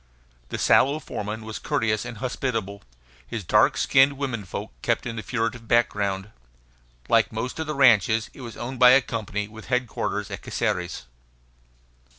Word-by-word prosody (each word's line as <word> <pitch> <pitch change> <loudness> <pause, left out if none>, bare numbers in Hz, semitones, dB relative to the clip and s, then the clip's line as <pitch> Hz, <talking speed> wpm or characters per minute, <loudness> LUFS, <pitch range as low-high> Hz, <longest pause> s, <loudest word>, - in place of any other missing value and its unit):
The - - -3
sallow 140 +3 +4
foreman 110 -6 -5
was 110 -1 -6
courteous 110 -1 0
and 115 - -7
hospitable. 115 -5 -3 0.5
His 110 - -5
dark - - +3
skinned 135 +1 +4
women 130 -7 -4
folk 90 - -6
kept - - 0
in 115 -2 -4
the 110 - -4
furtive 115 0 -3
background. 105 -4 +1 0.8
Like 115 -1 +3
most 115 +6 -4
of 160 - -3
the 150 - -3
ranches, 115 -4 +4
it - - -12
was 120 -2 -8
owned 125 +1 -6
by 125 0 +8
a 135 - +6
company 105 -2 -3
with 110 +1 -12
headquarters 125 -2 -2
at - - -6
Caceres. 90 -7 -2
115 Hz, 160 wpm, -25 LUFS, 105-125 Hz, 0.8 s, by